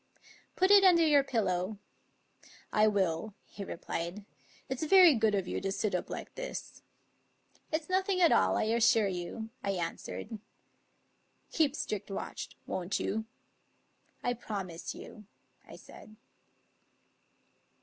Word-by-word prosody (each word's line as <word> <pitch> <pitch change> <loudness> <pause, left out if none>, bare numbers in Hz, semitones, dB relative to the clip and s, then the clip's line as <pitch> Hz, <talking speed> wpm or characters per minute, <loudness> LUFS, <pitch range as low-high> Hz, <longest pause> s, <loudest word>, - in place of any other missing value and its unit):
" - - -27
Put 375 +2 +3
it 405 -1 +8
under 345 -3 +6
your 290 -3 +5
pillow." 200 -6 -1 0.5
" - - -30 0.3
I 215 0 +5
will," 195 -1 0
he 200 - -8
replied. 175 +2 -5 0.2
" - - -29
It's 265 -1 -4
very 360 0 +7
good 220 -3 +2
of 190 -2 -1
you - - -3
to 195 - -2
sit 205 +1 -1
up 180 - -2
like - - -6
this." - - -7 0.5
" - - -37
It's 315 0 -1
nothing 375 0 +1
at 345 -2 +5
all, 95 0 +3
I - - +1
assure 225 -1 +3
you," 190 +5 -5
I 200 - 0
answered. 190 +5 -5 1.1
"Keep 300 -3 +2
strict 215 -11 -4
watch, 195 - -5 0.2
won't 185 +1 -2
you?" 220 +2 -2 0.5
" - - -41
I 245 - +1
promise 195 -8 -6
you," 210 -2 -11 0.4
I - - -11
said. 215 - -14
215 Hz, 145 wpm, -31 LUFS, 195-295 Hz, 1.1 s, it